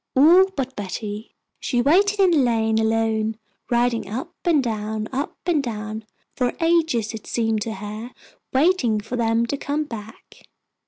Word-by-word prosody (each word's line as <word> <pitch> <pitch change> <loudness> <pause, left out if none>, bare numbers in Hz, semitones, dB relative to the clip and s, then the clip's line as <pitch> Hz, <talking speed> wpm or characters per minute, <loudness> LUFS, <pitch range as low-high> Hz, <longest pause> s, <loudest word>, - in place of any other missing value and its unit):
All 340 +8 +7
but 265 -1 -3
Betty. 205 +2 -6 0.2
She 245 - -1
waited 395 +11 +3
in 380 -2 +5
the 330 - +4
lane 225 -3 +2
alone, 220 0 +1 0.3
riding 240 -3 +1
up 265 +11 -5
and 315 -6 +3
down, 215 -2 -3
up 270 +2 -3
and 340 -5 +2
down, 215 -3 -5 0.3
for 250 -1 0
ages 320 -10 +2
it 220 - -8
seemed 225 -2 0
to 220 +1 -3
her, 215 +4 -6 0.4
waiting 265 - +3
for 220 +4 -5
them 230 -1 +2
to 280 +4 -3
come 290 +2 -1
back. 225 -5 -11
235 Hz, 155 wpm, -23 LUFS, 220-285 Hz, 0.4 s, All